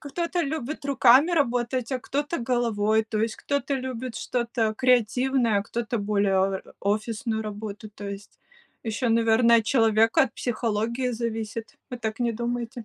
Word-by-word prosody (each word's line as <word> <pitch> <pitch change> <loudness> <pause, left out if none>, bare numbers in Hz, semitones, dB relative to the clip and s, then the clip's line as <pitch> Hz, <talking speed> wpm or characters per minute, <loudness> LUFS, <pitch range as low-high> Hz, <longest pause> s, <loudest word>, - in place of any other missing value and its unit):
кто-то 340 +4 -2
любит 305 0 -4
руками 275 +3 +5
работать, 250 -4 0
а 255 - 0
кто-то 290 +5 -2
головой, 220 -3 +1
то 215 - -2
есть 225 0 -1
кто-то 280 0 -2
любит 255 -2 -4
что-то 235 -3 -1
креативное, 250 -2 +2
а - - -1
кто-то 230 +1 -3
более 200 -1 +1
о 190 0 +1 0.2
офисную 220 +2 -1
работу, 210 0 -6
то 205 -1 -8
есть. 200 +1 -9 0.5
Еще, 225 +2 -1
наверно, 230 +1 +4
от 225 - +1
человека, 225 -1 +4
от 260 - -2
психологии 235 +1 -1
зависит, 225 -1 -4 0.2
вы 250 - -5
так 220 0 -4
не 235 -1 +1
думаете? 235 +1 -4
235 Hz, 150 wpm, -25 LUFS, 220-255 Hz, 0.5 s, руками